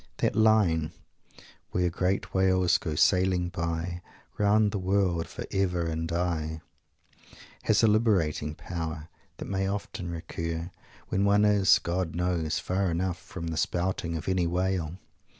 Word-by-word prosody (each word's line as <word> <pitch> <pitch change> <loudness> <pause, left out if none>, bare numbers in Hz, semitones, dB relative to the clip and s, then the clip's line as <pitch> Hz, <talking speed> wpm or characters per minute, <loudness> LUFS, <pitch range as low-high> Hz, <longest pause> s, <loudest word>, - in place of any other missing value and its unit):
That - - 0
line, 105 -8 +3 0.8
"Where 90 -1 0
great 90 +3 -1
whales 95 -1 +3
go 80 -3 -3
sailing 90 +1 +3
by 85 0 -3 0.4
Round 105 +1 +4
the 100 - -2
world 95 -3 +1
for - - -7
ever 90 -3 0
and 80 0 -3
aye," 80 -2 -2 1.0
has 110 +1 +3
a - - +7
liberating 95 -9 +1
power 80 -2 -5 0.3
that - - -6
may 95 0 -1
often 100 -2 -4
recur, 85 0 -4 0.4
when 95 - +1
one 100 +1 +4
is, 100 -2 +5
God 85 -1 -2
knows, 85 -3 0
far 95 0 0
enough 85 +1 -1
from 85 0 -7
the 80 - -3
spouting 85 -1 -1
of 80 - -7
any 95 -2 +1
whale! 90 -1 -1
90 Hz, 140 wpm, -28 LUFS, 85-95 Hz, 1.0 s, a